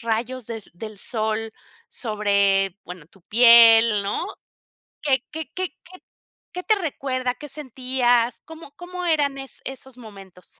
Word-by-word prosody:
rayos 230 +1 -3
del 225 -2 -6
del 215 +4 -9
sol 220 +1 -3 0.4
sobre, 200 -4 +1
bueno, 180 -3 -10
tu 195 +2 -24
piel, 230 0 +7
¿no? 200 +1 -2 0.8
¿Qué 265 -4 +1
qué 315 -1 -7
qué 370 -1 -4
qué 370 +1 -14 0.5
qué 360 - -5
te 435 - +3
recuerda? 265 -8 -3
¿Qué 295 +3 -10
sentías? 255 -3 0
¿Cómo 320 -2 -12
cómo 360 0 -7
eran 290 -5 +1
es 270 0 -10
esos 265 -1 -8
momentos? 195 -6 -14
240 Hz, 135 wpm, -23 LUFS, 215-280 Hz, 0.8 s, piel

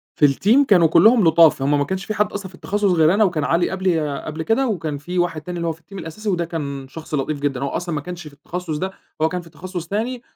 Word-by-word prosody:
في 150 - +4
الTeam 215 - +3
كانوا 175 -5 +5
كلّهم 215 +8 +5
لطاف، 165 -3 +5
هُم 145 +2 +2
ما - - +2
كانش 190 +5 -4
في 215 - -3
حد 210 0 0
أصلًا 200 -2 -5
في 185 - -15
التخصص 205 +1 0
غير 165 -1 +4
أنا 210 +2 +4
وكان 165 -7 0
علي 170 +3 +1
قبلي 165 -7 -1
قبل 155 +1 -5
كده 260 +7 +1
وكان 160 -9 -2
في 175 +6 -4
واحد 170 -3 0
تاني 175 +3 -6
اللي 170 0 -2
هو - - +1
في 160 0 -11
الTeam 195 +5 -12
الأساسي 210 +7 -5
وده 175 -3 0
كان 140 -5 -5
شخص 155 +2 -10
لطيف 145 +1 -1
جدًا، 140 -2 -2
هو 140 - -1
أصلًا 175 -2 -3
ما 150 - -2
كانش 175 0 -8
في 150 - -13
التخصص 160 +2 -5
ده، 190 +5 -3 0.3
هو 160 - +3
كان 180 +1 -3
في 170 - -16
التخصص 175 0 -7
تاني، 230 +5 -2
170 Hz, 265 wpm, -21 LUFS, 155-190 Hz, 0.3 s, كانوا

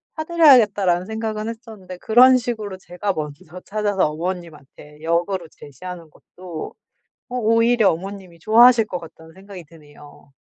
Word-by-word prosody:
사 315 - -4
드려야겠다.'라는 215 - +4
생각은 220 0 -4
했었는데 220 -6 -10
그런 250 +6 +5
식으로 220 -5 -5
제가 185 +2 -4
먼저 155 +2 -8
찾아서 205 -4 0
어머님한테 155 -3 -8
역으로 170 +2 -2
제시하는 165 +3 -11
것도 175 -3 -10 0.5
어 250 - -6
오히려 230 -1 +3
'어머님이 185 0 -8
좋아하실 230 +4 +5
것 180 - -5
같다.'는 160 -1 -15
생각이 195 -2 -12
드네요. 145 -2 -18
190 Hz, 360 characters per minute, -20 LUFS, 170-220 Hz, 0.5 s, 그런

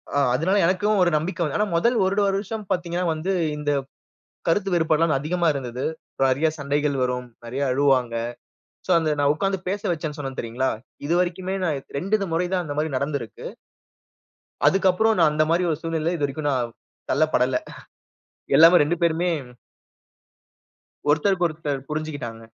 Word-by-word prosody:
ஆ, - - +3
அதுனால 185 +10 +2
எனக்கும் 200 +3 +2
ஒரு 175 - +4
நம்பிக்கை 175 +3 -3
வந்த 150 +2 -1
ஆனா, 210 0 +1
முதல் 235 +8 +2
ஒரு 190 +1 0
வருஷம் 205 +2 -2
பார்த்தீங்கன்னா 175 0 -1
வந்து 165 +5 -3 0.3
இந்த 145 0 -1 0.8
கருத்து 195 +3 +2
வேறுபாடு 160 -2 +2
எல்லாம் 160 -4 +3
அதிகமா 170 +3 0
இருந்தது. 125 -2 -4 0.4
நிறைய 135 +4 +3
சண்டைகள் 145 0 0
வரும். 125 0 -1 0.2
நிறைய 130 +4 -4
அழுவாங்க. 130 -3 +2 0.7
சோ, - - -13
அந்த 160 -1 0
நான் 145 0 +4
உட்கார்ந்து 195 +3 -1
பேச 200 +1 -2
வச்சேனு 155 -2 -4
சொன்னேன் 135 -2 -5
தெரியுங்களா? 120 +3 -1 0.4
இதுவரைக்குமே 180 +3 0
நான் 155 -5 0 0.2
2 195 +8 +1
இத 195 - -1
முறை 175 +2 +1
தான் 180 -1 +1
அந்தமாரி 150 +1 -2
நடந்திருக்கு. 140 -4 -4 1.2
அதுக்கு 195 0 +3
அப்புறம் 220 +3 +2
நான் 155 -2 +5
அந்தமாரி 155 +4 +2
ஒரு 150 - -1
சூழ்நிலையில 165 +1 -1
இதுவரைக்கும் 145 0 -1
நான் 120 -3 -1 0.4
தள்ளப்படல 130 -5 +2 1.0
எல்லாமே 165 +2 +8
2 165 +4 0
பேருமே 170 +2 +2 1.8
ஒருத்தருக்கு 175 +4 +2
ஒருத்தர் 145 -4 -4
புரிஞ்சுகிட்டாங்க. 145 -7 -5
155 Hz, 145 wpm, -23 LUFS, 140-180 Hz, 1.8 s, எல்லாமே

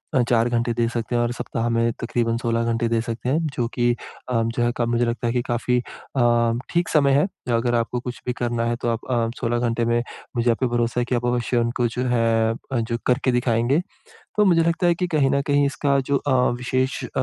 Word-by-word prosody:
अ, 130 - +5
4 120 0 +3
घंटे 120 0 0
दे 115 0 +1
सकते 120 0 -3
हैं 120 - +2
और 120 0 0
सप्ताह 115 0 -3
में 115 0 +2
तकरीबन 115 -1 0
16 115 -1 0
घंटे 115 0 0
दे 115 0 +1
सकते 115 +2 -4
हैं, 150 - +2 0.2
जो 120 -2 0
कि 120 -1 +2 0.4
अ, 115 -2 +1
जो 115 +1 -1
है 120 - +2
क 120 - +1
मुझे 120 0 +1
लगता 120 +1 -2
है 115 - +1
कि 120 - +1
काफ़ी 120 +1 0
अ, 120 -2 0
ठीक 175 -1 0
समय 140 -3 +3
है। 170 - +2 0.3
अगर 120 +1 +1
आपको 115 +1 0
कुछ 125 0 -7
भी 125 - -1
करना 120 -1 -1
है, 120 0 0
तो - - -1
आप 115 -1 -2
अ, 115 -2 +1
16 120 +1 0
घंटे 115 0 0
में 120 0 +2 0.4
मुझे 120 +1 +2
आप 115 - -2
पे 130 - +1
भरोसा 120 0 0
है 120 - 0
कि 125 - +2
आप 120 0 -1
अवश्य 120 0 0
उनको 120 +1 +1
जो 125 - 0
है 115 -1 +2
अ, 125 +1 -4
जो 115 +1 -2
करके 125 +1 +2
दिखाएँगे। 120 +3 +2 0.6
तो 210 - +5
मुझे 170 -3 +4
लगता 170 +2 +1
है 170 - +4
कि 180 +1 -1
कहीं 145 -5 +2
न 140 - +2
कहीं, 145 0 +3
इसका 140 0 +1
जो 140 0 +2
अ, 140 -1 -1 0.2
विशेष 130 +1 -1
अ, - - -9
120 Hz, 245 wpm, -23 LUFS, 115-130 Hz, 0.6 s, अ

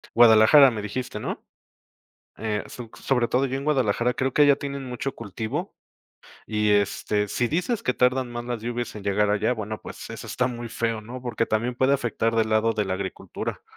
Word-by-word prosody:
Guadalajara, 120 +4 +8
¿me 110 -2 -4
dijiste, 115 +5 -4
no? - - -5 0.9
Eh, 105 -1 -2
su 120 -2 -9
sobre 125 -3 +1
todo 130 +2 +2
yo 135 +1 -2
en 140 - -6
Guadalajara 125 -4 +1
creo 130 -1 -1
que 150 - +4
allá 140 -1 +6
tienen 140 -1 -5
mucho 125 +2 -4
cultivo 110 0 -5 0.7
y, 105 -1 +1
este, 105 0 +1
si 120 +4 -1
dices 180 +8 -1
que 125 - 0
tardan 125 0 +2
más 120 0 -5
las 120 -2 -4
lluvias 120 -1 -3
en 105 - -8
llegar 100 +1 +1
allá, 110 +4 +1
bueno, 110 -2 -5
pues, - - -9
eso - - -7
está 125 - 0
muy 120 -2 -5
feo, 115 -1 -2
¿no?, 125 +4 -8
porque 120 -2 -1
también 120 +3 -1
puede 130 +3 +3
afectar 115 -3 -1
del 110 -1 +2
lado 110 +1 +3
de 105 - 0
la 95 - -2
agricultura. 95 0 -5
120 Hz, 195 wpm, -25 LUFS, 110-125 Hz, 0.9 s, Guadalajara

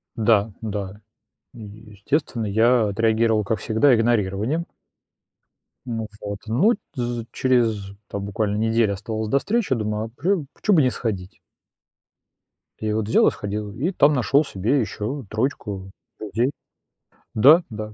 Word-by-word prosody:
Да, 110 -1 +2
да. 105 -1 -5 0.5
И, 115 - -11 0.3
естественно, 115 +2 -2
я 110 +2 +3
отреагировал, 110 +1 +2
как 110 +1 -1
всегда, 120 +4 +3
игнорированием. 115 - +1 1.2
Ну 115 -3 -4
вот, 100 0 -5
ну, 165 - +3 0.2
тз 120 -3 -3
через, 115 -6 +1 0.2
там 100 -1 -4
буквально 105 0 -1
неделя 110 -1 +2
оставалась 110 +2 -4
до 140 - +3
встречи, 215 - 0
думаю, 105 0 -2
а - - -8
прю 170 - 0
а - - -10
почему 205 -5 +3
бы - - +6
не 130 - +3
сходить? 100 -6 -4 1.4
И 110 -1 -2
вот 110 -1 -1
взял - - +5
и - - +4
сходил, 105 0 -5
и 155 - -1
там 150 -4 +4
нашел 140 +3 +3
себе 115 +8 0
еще 115 +3 -4
троечку 105 -5 -3 0.3
людей. 115 +5 -1 0.8
Да, 150 +10 +6
да. 110 0 -7
110 Hz, 140 wpm, -23 LUFS, 105-125 Hz, 1.4 s, бы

